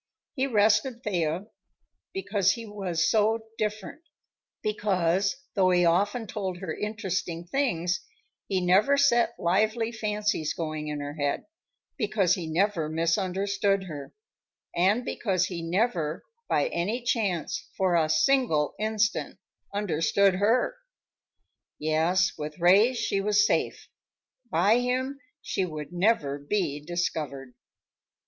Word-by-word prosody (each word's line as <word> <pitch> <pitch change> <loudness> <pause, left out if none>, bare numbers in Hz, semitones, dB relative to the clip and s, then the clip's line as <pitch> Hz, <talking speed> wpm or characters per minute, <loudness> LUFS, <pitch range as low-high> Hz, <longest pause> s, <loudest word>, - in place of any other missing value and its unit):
He 270 -1 0
rested 220 +2 +2
Thea 175 -2 -1 0.7
because 205 - +1
he 230 -1 -7
was 195 -6 -1
so 220 +1 +2
different; 210 - -3 0.6
because, 195 -3 +1 0.2
though 190 -3 +3
he 175 -1 +4
often 200 +7 +2
told 190 -3 -4
her 175 -3 -5
interesting 190 -5 -3
things, 180 -7 0 0.5
he 190 -2 0
never 195 +10 +4
set 240 -4 +3
lively 215 +6 +1
fancies 210 -7 -1
going 155 -2 -4
in 150 -1 -3
her 145 0 -5
head; 145 -2 -2 0.5
because 210 -5 +2
he 175 -5 -3
never 170 -1 0
misunderstood 195 +4 0
her, 150 -6 -8 0.6
and 200 +8 +2
because 185 -8 0
he 175 -3 -5
never, 170 -3 -1 0.3
by - - +2
any 220 - -2
chance, 205 - -1
for 185 -2 +2
a 160 -2 +2
single 160 - +2
instant, 215 -2 0 0.3
understood 200 0 +2
her! 225 - +1 1.0
Yes, 165 +4 +2
with 150 0 -5
Ray 195 +8 +5
she 200 -4 0
was 210 +1 +3
safe; - - -1 0.6
by 200 +8 +3
him 260 +3 -1 0.2
she 195 - -1
would 155 -2 -6
never 175 -7 +1
be 150 -1 -1
discovered! 150 -6 -3
190 Hz, 120 wpm, -27 LUFS, 170-215 Hz, 1.0 s, Ray